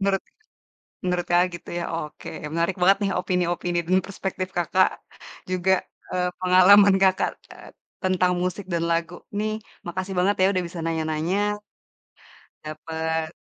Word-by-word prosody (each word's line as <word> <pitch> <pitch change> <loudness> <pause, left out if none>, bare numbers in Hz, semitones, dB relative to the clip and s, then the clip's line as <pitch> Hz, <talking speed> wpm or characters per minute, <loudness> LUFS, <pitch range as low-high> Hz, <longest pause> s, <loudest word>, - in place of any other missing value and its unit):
Menurut, 195 -1 +1 0.8
menurut 180 -1 0
Kakak, 175 +1 +5
gitu 170 - -9
ya 170 - -3
oke 155 -2 -6 0.2
menarik 170 +3 0
banget 195 +2 +6
nih - - 0
opini-opini 175 -1 -1
dan 185 +2 +4
perspektif 190 -1 -4
Kakak, 185 +2 +3 0.6
juga, 185 +1 +3 0.4
eee, 180 0 0
pengalaman 190 +2 +7
Kakak, 190 -1 +3 0.2
eee, - - -13 0.3
tentang 185 -1 +2
musik 185 +2 -3
dan 170 -1 0
lagu 165 +1 -1 0.2
nih 215 +1 0 0.3
makasih 185 +2 -4
banget 195 +3 +3
ya - - +6
udah 185 - +1
bisa 170 - -9
nanya-nanya. 165 +6 0 1.1
Dapet 160 +1 -3
180 Hz, 135 wpm, -24 LUFS, 170-190 Hz, 1.1 s, pengalaman